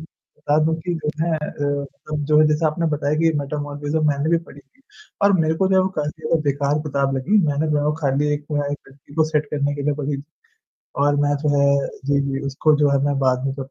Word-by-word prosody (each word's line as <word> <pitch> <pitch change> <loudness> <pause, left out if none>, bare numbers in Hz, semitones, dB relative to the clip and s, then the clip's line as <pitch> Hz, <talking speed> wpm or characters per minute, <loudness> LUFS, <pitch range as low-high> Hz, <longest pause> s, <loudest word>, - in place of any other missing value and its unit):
बता 155 -1 -3
दूँ 160 +1 +2
कि 175 - 0
जो 155 -2 -2
है 170 - 0
अ, 155 - -7 0.4
मतलब 150 +1 -6
जो 155 +1 +5
जैसे 155 +1 +2
आपने 160 +2 0
बताया 145 0 -1
कि 165 - +4
मैटर 145 +1 -3
मोरिस्म 145 +2 -2
मैंने 145 +1 0
भी 170 - +4
पढ़ी 145 - -14
थी 145 - -32 0.4
और 200 0 +5
मेरे 160 0 +1
को 190 +3 +1
जो 190 - +2
है 190 - +5
वो 185 - 0
काफ़ी 150 0 -1
ज़्यादा 165 - +1
बेकार 140 0 0
किताब 135 -1 0
लगी, 185 +12 +2
मैंने 145 +1 0
वो 150 +1 +1
खाली 140 0 +1
एक 145 0 -6
वो 145 -1 0
एक 145 - -3
लड़की 140 +1 -18
को 160 0 +3
सेट 150 0 +1
करने 145 0 0
के 145 - -4
लिए 145 +1 +1
पढ़ी। 140 -1 -3 0.8
और 145 0 +3
मैं 145 0 +2
जो 150 - +1
है, 140 0 +3 0.2
जी, 140 0 +2
जी 135 -1 -2
उसको 150 +3 +2
जो 145 -1 +3
है 140 - +3
मैं 145 -1 0
बाद 130 -1 +1
में 135 - -1
जी 135 0 -6
145 Hz, 240 wpm, -21 LUFS, 140-155 Hz, 0.8 s, जो